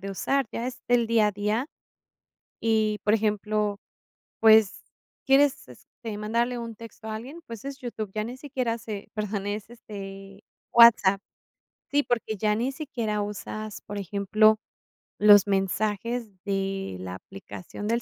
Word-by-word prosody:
de 195 - -5
usar, 270 +8 0
ya 235 - -3
es 255 0 -6
el 245 -1 +3
día 225 -2 +4
a - - 0
día 210 +5 -1 0.9
y 215 -2 +1
por 210 - +3
ejemplo, 210 -1 0 0.6
pues 220 -2 +5 0.4
quieres, 275 - +3
este, 210 - -9
mandarle 235 +3 0
un 230 -1 -6
texto 225 0 -11
a 215 - -3
alguien, 270 +10 -8
pues 230 +2 -9
es 275 -1 -5
YouTube, 220 -5 -5
ya 215 0 -1
ni 245 +3 -6
siquiera 255 -5 -2
se 215 -3 -7
perdón, 210 -2 -3
es, 210 +1 -4
este, 195 -3 -10 0.3
WhatsApp. 215 -4 +7 0.7
Sí, 290 0 +3
porque 230 -4 -1
ya 210 +1 +1
ni 250 +4 -1
siquiera 235 -8 -3
usas, 210 +1 -6
por 205 0 -6
ejemplo, 210 +3 +3 0.6
los 205 -1 +7
mensajes 210 +4 -1 0.2
de 195 - -2
la 90 0 -6
aplicación 100 - -9
del 235 +1 +1
215 Hz, 145 wpm, -26 LUFS, 205-235 Hz, 0.9 s, WhatsApp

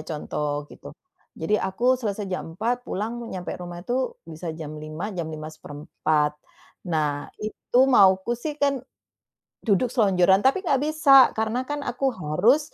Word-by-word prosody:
contoh 150 -1 -3
gitu. - - -13 0.5
Jadi, 160 +6 +1
aku 190 +5 -4 0.2
selesai 210 -3 -2
jam 185 - -3
4:00, 230 +7 0
pulang 215 +4 -3 0.2
nyampe 180 -1 -5
rumah 175 -1 -7
itu 240 - -3 0.4
bisa 160 +2 -7
jam 155 -2 -6
5:00, 155 +3 -6
jam 170 -2 -2
5:15. 155 0 -2 0.6
Nah, 150 -2 0 0.2
itu 215 +3 -2 0.2
mauku 190 +1 +5
sih 300 +4 -4
kan 280 -1 +3 0.9
duduk 210 +3 +3
selonjoran, 190 -5 +4
tapi 265 +7 +4
nggak 275 -6 +2
bisa, 310 -1 +1 0.3
karena 220 +3 0
kan 290 0 -2
aku 250 +2 -3 0.2
harus 180 - +3
190 Hz, 140 wpm, -24 LUFS, 155-240 Hz, 0.9 s, mauku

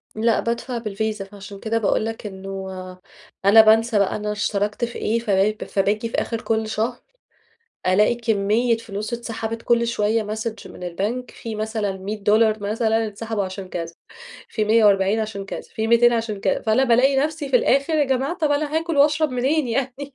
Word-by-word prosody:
لأ، 225 +1 +2
بادفع 235 +2 -2
بالفيزا 215 -2 -3
فعشان 200 0 -11
كده 225 +2 -1
باقول 215 0 +1
لك 225 -1 -5
إنه 195 -1 -6 0.8
أنا 215 +3 +9
بانسى 220 0 +4
بقى 200 - +1
أنا 210 0 -3
اشتركت 205 +2 -1
في 240 - -8
إيه، 225 +2 0
فب 210 -1 +1
فباجي 210 +3 0
في - - -5
آخر 230 -1 -2
كل 220 -1 -1
شهر 220 +3 -2 0.9
ألاقي 210 +5 +4
كمية 225 +1 +1
فلوس 215 0 -6
اتسحبت 230 -1 -4
كل 235 0 +2
شوية 220 0 +1
ماسج 215 +1 -5
من - - -11
البنك 205 +8 -3
في 225 -2 -7
مثلًا 215 -2 -2
$100 215 +2 +1
مثلًا 225 +1 +1
انسحبوا 215 0 -3
عشان 190 0 -6
كذا 170 -2 -5 0.6
في 215 - -1
140 210 -2 +4
عشان 210 -3 -4
كذا - - -6
في 220 0 -4
200 240 +1 +5
عشان 225 -3 -2
كذا، 195 - 0
فأنا 220 +4 +2
بالاقي 265 +2 +4
نفسي 295 0 -1
في 255 - +2
الآخر 275 +5 +2
يا 305 - +3
جماعة 270 +5 -1
طب 305 -4 +1
أنا 295 +1 0
هاكل 330 -1 -2
وأشرب 300 +2 +4
منين 265 +3 +1
يعني 270 +3 -3
220 Hz, 175 wpm, -22 LUFS, 205-240 Hz, 0.9 s, أنا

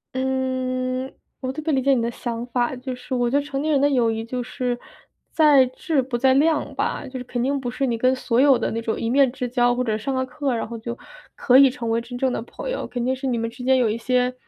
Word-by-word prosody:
嗯， 260 0 -1 0.3
我 260 -1 -3
特 310 - -5
别 315 +1 -1
理 270 -2 +2
解 275 +1 +4
你 250 - +1
的 230 - 0
想 235 0 -4
法， 245 +1 0
就 255 0 -5
是 250 - -8
我 245 -1 +1
觉 275 - +2
得 290 - -5
成 275 -2 -3
年 310 +1 0
人 285 - +3
的 285 - +4
友 245 -4 +3
谊， 225 0 -3
就 250 +2 -3
是 245 0 -3 0.5
在 295 -4 +6
质 280 +3 -1
不 255 -1 -3
在 260 +2 +4
量 300 +3 +2
吧， - - -2
就 260 0 -6
是 - - -6
肯 245 -1 -2
定 275 +2 0
不 245 - -3
是 250 +3 -1
你 240 -3 0
跟 255 +3 +2
所 250 -1 +1
有 275 -2 +6
的 - - -2
那 230 - -2
种 225 -1 -2
一 230 - -2
面 265 +1 +4
之 250 0 -4
交 245 0 +2
或 250 - 0
者 220 -3 0
上 270 +4 -2
了 260 0 0
课， 260 0 -2
然 225 - -3
后 230 0 -7
就 235 +2 -6 0.4
可 255 0 +5
以 275 -1 +8
成 235 -2 -4
为 230 +1 +1
真 245 +1 -8
正 260 0 0
的 - - -2
朋 - - -7
友。 - - -3
肯 245 -1 -3
定 260 +1 +1
是 265 +1 -4
你 245 -2 0
们 230 - -1
之 250 +2 -10
间 260 +1 +4
有 245 -3 +3
一 215 - 0
些， 250 +1 +1
255 Hz, 305 characters per minute, -23 LUFS, 240-265 Hz, 0.5 s, 以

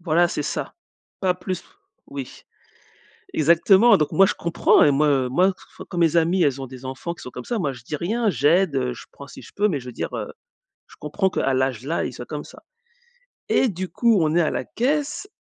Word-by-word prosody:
Voilà 170 0 +2
c'est 150 - -3
ça, - - -4 0.5
pas 185 -2 +1
plus, 185 -1 -5 0.4
oui. 140 -2 -8 0.9
Exactement 190 +8 +5
donc 150 -5 -1
moi 195 0 +6
je - - -1
comprends 170 0 +3
et 145 - +5
moi, 150 +2 +2
heu 135 -3 +2
moi 180 +9 +3 0.2
f - - -11
quand 175 - -5
mes 170 -1 +3
amis 170 +2 +3
elles 140 -1 0
ont 135 - -6
des 130 0 -11
enfants 130 +6 -5
qui - - -14
sont 125 - -8
comme 125 0 -8
ça, 235 - -2
moi 150 -8 -1
je 120 -4 -12
dis 150 - -5
rien, 215 +8 0
j'aide, 165 -1 +2
heu, 125 -1 0
je - - -11
prends 140 - -12
si - - -12
je - - -14
peux. 205 - +3
Mais 150 -8 -2
je 125 - -13
veux 125 - -7
dire, - - -5
heu, - - -4 0.6
je - - -17
comprends 190 -1 -1
qu'à 135 -6 0
l'âge 130 -3 0
là, 165 +3 -1
ils - - -4
soient - - -9
comme - - -6
ça - - -15 0.9
et 255 - +2
du 185 0 -4
coup 230 -3 +2
on 155 0 +1
est 175 - +4
à 155 - +1
la - - -3
caisse 295 - -2
165 Hz, 235 wpm, -23 LUFS, 135-190 Hz, 0.9 s, moi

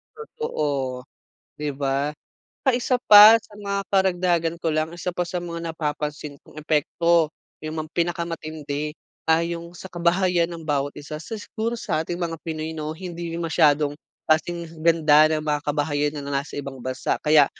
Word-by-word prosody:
Totoo, 145 - -3 0.6
'di 150 -2 -3
ba. 140 +1 -1 0.5
Tsaka 270 - +4
isa 250 +1 +1
pa, 210 +2 +10
sa 220 -1 -18
mga 200 -1 -3
karagdagan 175 -3 +2
ko 165 -2 -1
lang, 155 +1 0
isa 175 +1 -5
pa 180 - 0
sa 175 +1 -3
mga 170 -1 -5
napapansin 150 -2 -4
kong - - -14
epekto, 160 +2 +2 0.3
yung 155 +1 -5
mga 155 0 -5
pinakamatindi, 160 -4 -3 0.4
ah, 160 - +6
yung 170 0 -5
sa 175 +2 -10
kabahayan 175 0 +1
ng 165 -2 -8
bawat 145 -1 0
isa. 150 +2 -7
Sa 220 +6 -6
siguro 230 +3 -3
sa 155 - -1
ating 175 +1 -5
mga 170 -2 -2
pinoy 160 -1 -4
'no, 155 -1 -4
hindi 170 0 -6
masyadong 155 -3 +3 0.3
kasing 165 0 -1
ganda 155 -2 +5
ng 155 -1 0
mga 150 -1 +1
kabahayan 145 0 0
ng 140 - -6
nasa 140 0 -3
ibang 140 -1 -6
bansa. 130 0 -2
Kaya 150 -2 +6
160 Hz, 160 wpm, -24 LUFS, 150-175 Hz, 0.6 s, pa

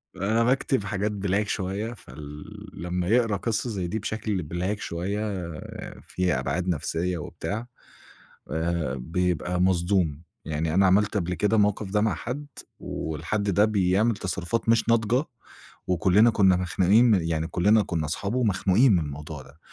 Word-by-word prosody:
أنا 110 +5 +1
باكتب 130 -1 +1
حاجات 100 +1 -1
black 100 0 -1
شوية 100 +4 -3
فال 75 -7 -10 0.4
لمّا 90 0 -2
يقرا 115 -1 +3
قصة 115 +3 -2
زي 95 -5 -3
دي 105 +6 -2
بشكل 105 -5 -3
black 95 +4 -1
شوية 95 +4 -3
آآ، 85 -6 -7
فيها 90 -7 0
أبْعاد 70 +8 -2
نَفْسية 85 +1 -1
وبتاع 105 +8 -5 0.8
آآ، 80 -3 -1
بيبقى 90 +5 -1
مصدوم 90 -4 +1 0.2
يعني 80 +1 -2
أنا 95 +1 +5
عملت 105 +3 +3
قبل 90 -2 -1
كده 105 +4 +1
الموقف 105 -1 +1
ده 105 +1 +2
مع 110 0 +1
حد 140 +5 -5 0.3
والحد 80 +7 -3
ده 100 +2 +4
بيعمل 105 +2 +2
تصرفات 95 +4 -3
مش 115 0 +3
ناضجة، 115 +4 +2 0.6
وكلنا 95 +5 +4
كنا 95 -4 +4
مخنوقين 95 +5 +3
من 105 -7 +4
يعني 80 -1 -1
كُلّنا 105 +5 +3
كُنّا 80 -5 -2
أصحابه 100 +9 -2
ومخنوقين 105 +1 +3
من 90 - +4
الموضوع 75 -1 -6
ده، 70 +4 -18
95 Hz, 150 wpm, -26 LUFS, 85-105 Hz, 0.8 s, أنا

